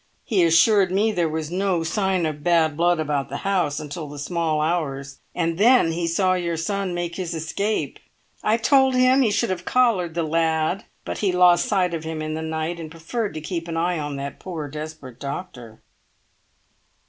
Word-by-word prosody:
He 195 -6 +2
assured 180 +4 +4
me 210 +4 +2
there 175 -5 0
was 155 0 -4
no 185 -2 0
sign 190 +1 0
of 150 -2 -4
bad 165 -3 +3
blood 175 +1 +2
about 145 -3 -1
the 140 - -4
house, 175 -7 +1
until 150 +1 -6
the 145 - -9
small 160 +1 -1
hours, 140 -4 -2 0.2
and 165 0 -1
then 235 -6 +5
he 170 +1 -2
saw 185 +2 +2
your 170 -2 -1
son 190 +2 -2
make 175 -1 -3
his 180 -3 -3
escape. 200 +7 -2 0.4
I 220 +2 +2
told 265 +2 +4
him 255 +1 +5
he 240 - +3
should 210 +1 0
have 180 -1 -3
collared 200 -10 +2
the 170 - 0
lad, 160 +2 0 0.2
but - - -4
he 200 -3 +1
lost 180 -1 +4
sight 185 -4 +1
of 165 -1 -3
him 160 0 -4
in 155 0 -3
the 160 - -3
night 160 +2 -3
and 160 -2 -7
preferred 165 +7 -4
to 155 - -4
keep 170 +1 -4
an 165 -1 -3
eye 175 0 0
on 145 -1 -4
that 140 0 -6
poor 165 -5 -5
desperate 150 -3 -8
doctor." 140 -6 -7
170 Hz, 195 wpm, -23 LUFS, 155-185 Hz, 0.4 s, then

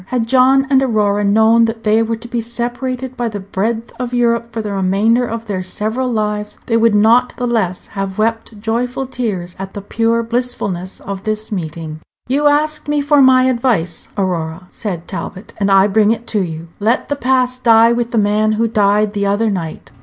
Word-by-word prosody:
Had 245 -3 -1
John 265 +2 +4
and 265 -1 +5
Aurora 210 -5 +1
known 220 +3 +4
that 225 0 -4
they 215 +1 +3
were 225 0 -1
to 225 +2 -11
be 235 -1 -2
separated 245 +2 -3
by 240 -1 -2
the 210 -2 -4
breadth 220 +4 -3
of 250 -1 -3
Europe 235 -1 +1
for 230 - -4
the 210 -2 -3
remainder 205 +6 +2
of 230 0 -5
their 200 -4 -3
several 220 +7 -2
lives, 210 -2 -2
they 230 - 0
would 230 -1 +3
not 230 +4 +4
the 250 - -2
less 215 -7 -1
have 195 -1 -5
wept 225 0 -2
joyful 245 +4 -2
tears 215 -9 -4
at 195 0 -7
the 205 - -5
pure 230 +2 0
blissfulness 225 -6 -3
of 195 -1 -6
this 215 0 -3
meeting. 160 -4 -5 0.3
"You 285 +4 +2
asked 300 +1 +1
me 295 0 +1
for 285 0 +3
my 260 -1 +6
advice, 235 -10 0
Aurora," 180 -2 -2
said 180 -6 -5
Talbot, 195 +2 -7
"and 200 -1 +1
I 195 0 +5
bring 210 +1 +3
it 230 +1 -1
to 210 - 0
you. 165 -2 -5
Let 220 +4 +1
the 285 - -1
past 255 -1 0
die 230 0 +6
with 235 0 -1
the 235 - -2
man 215 +1 +2
who 230 +2 +1
died 210 -1 +2
the 200 -1 -1
other 210 +2 +1
night. 165 -5 -5
225 Hz, 200 wpm, -17 LUFS, 200-240 Hz, 0.3 s, my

